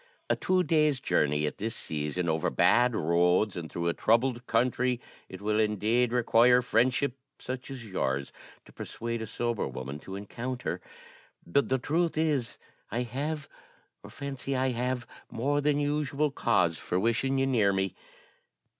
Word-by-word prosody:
A - - +4
two 185 0 +1
days' 155 -5 +2
journey 75 - +1
at 75 - -4
this 115 +3 -3
season, 75 +2 -3
over 80 -1 +1
bad 120 0 +4
roads 90 +5 +2
and 85 -3 -6
through 85 0 -2
a 85 - +2
troubled 120 +2 +1
country, 125 +1 +1 0.3
it 95 0 -9
will 105 +1 +1
indeed 110 +3 +2
require 125 +1 +5
friendship 125 +3 +2 0.2
such 130 0 -6
as 130 -4 -7
yours 70 -9 -2 0.3
to - - -17
persuade 115 0 -5
a 110 - -4
sober 120 +1 -2
woman 70 +3 -6
to 95 +5 -8
encounter. 120 +5 -4 0.6
But 110 +12 +1
the 130 - +3
truth 160 +5 0
is, 150 -7 0 0.3
I 120 +3 -1
have, 145 +5 -3 0.5
or - - -11
fancy 140 -1 -4
I 130 +1 +1
have, 125 +1 -2 0.2
more 145 +5 0
than 145 0 +2
usual 145 0 0
cause 85 - +1
for 90 - -1
wishing 115 +6 +1
you 135 - +2
near 115 -7 +3
me. 95 -1 -1
120 Hz, 155 wpm, -29 LUFS, 100-135 Hz, 0.6 s, require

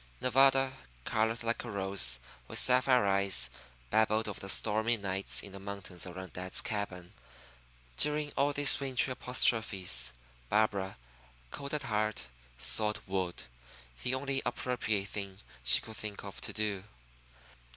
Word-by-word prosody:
Nevada, 135 +1 +4 0.3
colored 110 +2 -1
like 115 0 -1
a 120 - -7
rose, 95 - +3 0.3
with - - -2
sapphire 125 -2 +4
eyes, 95 -11 +1 0.4
babbled 110 0 +2
of 105 - -5
the 95 - -6
stormy 110 +3 +1
nights 95 -1 0
in 100 - -9
the 100 - -10
mountains 100 -2 -7
around 90 -1 -9
dad's 90 +1 -1
cabin. 95 -4 -4 0.8
During 150 0 +2
all 140 +1 +2
these 145 0 +7
wintry 135 -1 -1
apostrophes, 110 - +2 0.4
Barbara, 100 -3 0 0.5
cold 140 +1 -5
at 150 - -3
heart, 105 - -2 0.3
sawed 105 - +2
wood 95 -2 -3 0.6
the 125 - -1
only 135 0 -2
appropriate 120 -5 -2
thing 100 -2 -6 0.3
she - - +7
could 110 -1 -11
think 105 -1 -7
of 100 -1 -9
to - - -2
do. 105 -3 -2
105 Hz, 135 wpm, -31 LUFS, 95-125 Hz, 0.8 s, these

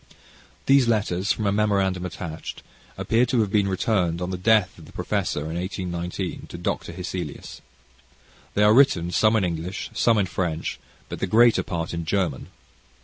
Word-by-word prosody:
These 135 -2 +5
letters, 100 -3 +1
from 110 - -1
a 100 - +2
memorandum 100 -3 +1
attached, 85 -2 -7 0.3
appear 115 +2 +2
to 120 -1 +2
have 105 -3 -1
been 100 -2 +2
returned 95 -3 0
on 90 +1 -3
the - - -2
death 105 -2 +2
of 80 - -13
the - - -14
professor, - - -2
in 80 +2 -5
1819, 90 0 -4
to - - -8
Dr. - - -3
Hesselius. 90 -3 -6 0.9
They 105 - +3
are 105 +1 +6
written, 110 -10 +4
some 110 +5 +3
in 110 - +2
English, 90 +2 -3
some 115 -2 +3
in 100 - +2
French, 85 -2 -3 0.3
but - - -7
the 95 - -1
greater 115 +4 +5
part 85 -3 -4
in 85 -1 -3
German. 85 -5 -1
95 Hz, 170 wpm, -24 LUFS, 85-105 Hz, 0.9 s, are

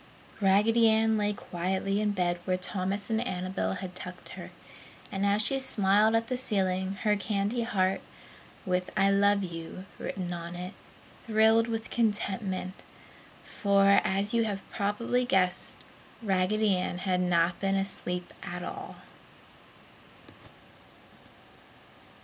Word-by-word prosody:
Raggedy 220 +4 +5
Ann 220 0 +3
lay 210 -1 +1
quietly 190 +1 -2
in 210 - +1
bed 180 -3 0
where 185 -1 +1
Thomas 195 +3 -3
and 220 0 +1
Annabel 185 -5 -2
had 185 -1 -6
tucked 180 -1 -9
her. - - -8 0.6
And 195 0 0
as 205 +2 +3
she 270 +4 0
smiled 215 -3 +3
at 225 0 +2
the 255 +2 -2
ceiling, 190 -5 0
her 210 -1 +3
candy 205 +3 -1
heart 195 -5 +1 0.6
(with 180 0 0
"I 195 +1 +4
LOVE 200 0 +3
YOU" 170 +1 -7
written 180 -2 -4
on 170 0 -6
it) 180 +3 -6 0.5
thrilled 220 +1 +4
with 225 -1 -4
contentment, 195 -4 -1 0.6
for, 200 -1 +4
as 195 +3 0
you 230 -1 +3
have 200 -3 -4
probably 220 +5 0
guessed, 185 -6 0 0.4
Raggedy 200 +1 +2
Ann 180 0 -2
had 185 0 0
not 175 -1 +2
been 195 0 +1
asleep 180 -2 -3
at 175 0 -5
all! - - -7
195 Hz, 125 wpm, -29 LUFS, 185-215 Hz, 0.6 s, Raggedy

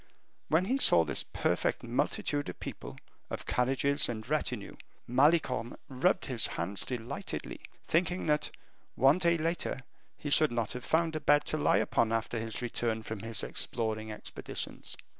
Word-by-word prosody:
When 165 +4 +2
he 260 +7 0
saw 85 - +8
this - - -1
perfect - - -1
multitude 145 +3 -1
of - - -8
people, - - -7 0.3
of - - -5
carriages, 135 +3 +2
and 110 -2 -5
retinue, 125 -7 -2 0.3
Malicorne 130 -2 +2
rubbed 145 +9 +1
his 125 -4 +1
hands 95 +4 -1
delightedly, 120 -2 -5 0.3
thinking 175 +2 +1
that, 150 -1 +1 0.5
one 135 +7 +5
day 170 -1 +3
later, 165 -3 -2 0.4
he 145 - -5
should 155 -1 +6
not 115 -3 -1
have 125 0 -6
found 160 0 +1
a - - -1
bed 145 0 +3
to - - +1
lie - - +3
upon 115 -1 +1
after 115 +1 -1
his 115 +2 -4
return 115 -2 -1
from 110 -1 -5
his 115 +2 -2
exploring 110 -2 -2
expeditions. 105 - -6
130 Hz, 155 wpm, -31 LUFS, 115-155 Hz, 0.5 s, saw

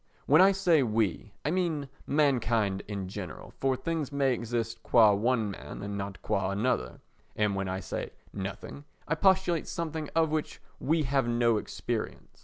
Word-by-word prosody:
When 150 +5 +6
I 195 +1 +7
say 180 -6 +3
"we," 110 -4 0
I 150 - +1
mean 165 -6 0 0.2
mankind 115 -9 +2 0.2
generally, 95 -2 -7
for 135 -1 +2
things 150 +2 -3
may 140 -2 +2
exist 115 -1 -3
qua 110 -4 +6
one 110 0 +1
man 75 -1 -8
and 100 0 -4
not 100 -1 -5
qua 95 -1 0
another. 100 - -1 0.3
And 105 -1 +1
when 95 0 -2
I 95 +1 -3
say - - -4 0.2
"nothing" 100 +8 -6 0.2
I 165 - +1
postulate 185 -1 +2
something 160 -2 -3
of 160 -2 +3
which 155 -1 -2 0.2
we 160 +2 +1
have 135 -2 +1
no 120 -1 +3
experience. - - -5
125 Hz, 160 wpm, -29 LUFS, 105-155 Hz, 0.3 s, I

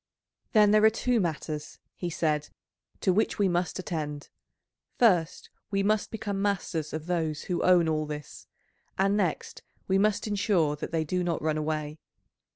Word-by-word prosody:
"Then 210 -2 +6
there 215 0 +5
are 220 - +8
two 240 +2 0
matters," 155 -4 -3 0.2
he 175 - -4
said, 150 -3 -1 0.5
"to 185 - +3
which 215 +4 +1
we 200 - +3
must 175 0 -1
attend; 150 -5 -4 0.7
first 180 -9 +2 0.2
we 195 -1 0
must 210 +1 +1
become 205 -3 -3
masters 185 -6 -1
of 155 0 -5
those 160 -4 -1
who 180 - -2
own 180 -2 +5
all 155 -1 0
this, 150 -2 -8 0.5
and 195 +1 +2
next 185 -6 -2 0.3
we 190 0 +3
must 210 0 +2
ensure 195 -7 +1
that 150 - -6
they 165 -1 0
do 180 +4 -1
not 170 -2 -1
run 155 -1 +1
away. 155 0 -3
175 Hz, 165 wpm, -28 LUFS, 155-200 Hz, 0.7 s, are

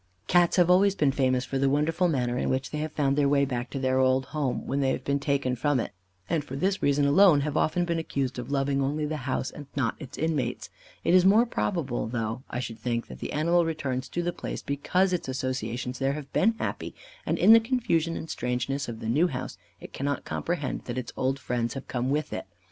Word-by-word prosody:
Cats 175 -1 +4
have 180 -1 +4
always 195 +2 +5
been 145 -6 +2
famous 130 -2 +1
for 135 - -2
the 135 0 +3
wonderful 160 +5 +2
manner 125 -6 0
in - - -1
which 130 +1 -1
they 150 - -3
have 155 0 -3
found 140 -3 +1
their 140 -1 +3
way 140 0 +3
back 125 -2 -3
to - - -5
their 130 -1 +1
old 130 0 +3
home, 140 -2 -2
when 140 - -1
they 135 -1 +2
have - - -2
been 140 0 0
taken 140 -3 0
from 140 +2 +1
it, - - -3 0.4
and 160 -3 0
for 135 - -7
this 190 +7 0
reason 140 0 +3
alone, 155 0 +6
have 150 0 -2
often 175 +3 +1
been 170 -1 -1
accused 135 -5 -2
of 125 +1 -6
loving 140 0 +1
only 150 +3 0
the 155 +1 -2
house 130 - -1
and 145 -2 -10
not 130 -5 +1
its 135 -4 -9
inmates. 155 -4 -2 0.3
It - - +2
is 185 -1 +7
more 210 +5 +6
probable 165 - -2
though, 115 0 -3
I 125 - -3
should 115 -3 -5
think, 115 0 -2
that - - -9
the - - -5
animal 170 +3 +2
returns 140 -5 -3
to 175 - -2
the 175 0 -1
place - - -6
because 180 +7 +1
its 175 - -2
associations 125 -1 -3
there 135 0 +1
have 145 -2 -8
been 225 +4 +3
happy, - - -4 0.3
and, - - -1
in 220 - +7
the 230 - +9
confusion 220 -9 0
and - - -6
strangeness 125 +1 -2
of 115 -1 -7
the 110 - -4
new 150 +10 +3
house, 130 -6 -5 0.2
it - - -11
cannot 145 +1 -2
comprehend 165 -5 -3
that 120 0 -4
its 125 -2 -5
old 130 +1 0
friends 120 -2 -2
have 135 - -7
come 125 +1 -2
with 150 +2 -1
it. - - -5
140 Hz, 235 wpm, -27 LUFS, 130-165 Hz, 0.4 s, the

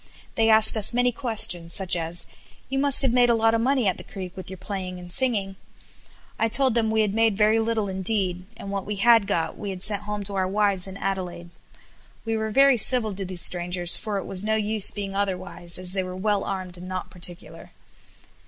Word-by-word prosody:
They 225 -1 +1
asked 220 0 +5
us 215 +2 +3
many 245 0 +2
questions 210 -9 +1
such 190 -3 0
as 170 0 -2 0.4
"You 270 +1 -2
must 280 -1 +7
have 260 -3 +1
made 245 -1 +3
a 235 - +3
lot 225 0 +2
of 230 - 0
money 260 0 0
at 185 - 0
the - - -9
Creek 185 -2 -9
with 185 - -8
your 190 - -8
playing 185 -1 -6
and 175 -1 -11
singing." 205 -7 -1 0.8
I 225 - +2
told 265 +1 +2
them 225 -1 0
we 220 0 +1
had 210 -2 -1
made 225 -2 +1
very 215 +1 +3
little 225 -2 -1
indeed, 190 -1 -1
and 200 - -8
what 200 -1 -3
we 210 - -3
had 225 0 +4
got 165 -2 -3
we 205 - -5
had 185 -1 -5
sent 205 -2 +3
home 210 0 -5
to 200 +1 -7
our 190 -1 -1
wives 195 -1 0
in 190 0 -9
Adelaide. 180 -3 -5 0.7
We 225 0 -2
were 220 0 -3
very 275 +3 +4
civil 225 -2 +2
to 195 +1 -6
these 180 -1 +1
strangers 175 0 +2
for 210 -2 -4
it 195 - -5
was 195 0 -1
no 220 +1 0
use 215 -1 +4
being 200 -2 -3
otherwise, 190 -3 -3
as 185 0 -4
they 195 - -1
were 185 0 -7
well 205 +1 -1
armed 185 -2 -6
and 180 +1 -10
not 185 0 -6
particular. 175 +1 -5
200 Hz, 220 wpm, -23 LUFS, 185-225 Hz, 0.8 s, must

